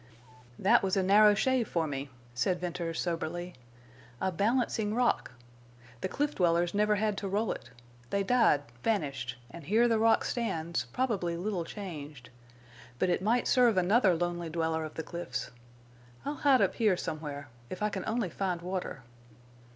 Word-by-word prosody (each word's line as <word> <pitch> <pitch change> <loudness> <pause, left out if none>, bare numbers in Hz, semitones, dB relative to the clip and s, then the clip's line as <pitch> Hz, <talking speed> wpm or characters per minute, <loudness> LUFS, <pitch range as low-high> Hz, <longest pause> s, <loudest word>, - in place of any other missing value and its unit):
"That 230 +5 +4
was 195 0 0
a 190 - +2
narrow 205 +2 +6
shave 255 +1 +1
for 165 -2 0
me," 140 -1 -4 0.2
said 175 +9 0
Venters, 170 -2 -3
soberly. 175 +1 -3 0.7
"A 190 - 0
balancing 215 +2 0
rock! 245 - +1 0.7
The - - 0
cliff 290 +9 -1
dwellers 175 -1 +2
never 210 +1 +3
had 210 0 0
to 200 - -4
roll 205 +2 0
it. 120 - -7 0.4
They 200 +7 0
died, 210 - +3 0.2
vanished, 135 - -1
and 170 - -10
here 225 +7 +4
the 225 -2 +2
rock 225 0 +4
stands, 165 - -2
probably 180 - -1
little 180 -2 -2
changed.... 150 - -8 0.7
But 185 - +1
it 175 - +1
might 230 +5 +2
serve 245 -6 +4
another 190 +1 +4
lonely 175 0 -2
dweller 160 0 -1
of 155 - -9
the 160 - -4
cliffs. 130 -9 -5 0.7
I'll 285 - -1
hide 280 -3 +4
up - - +2
here 215 -6 +2
somewhere, 150 -4 -5 0.2
if 185 - -5
I 210 - +2
can 195 -2 -4
only 220 -6 -1
find 180 -2 -2
water." 180 -6 -4
185 Hz, 160 wpm, -30 LUFS, 165-215 Hz, 0.7 s, narrow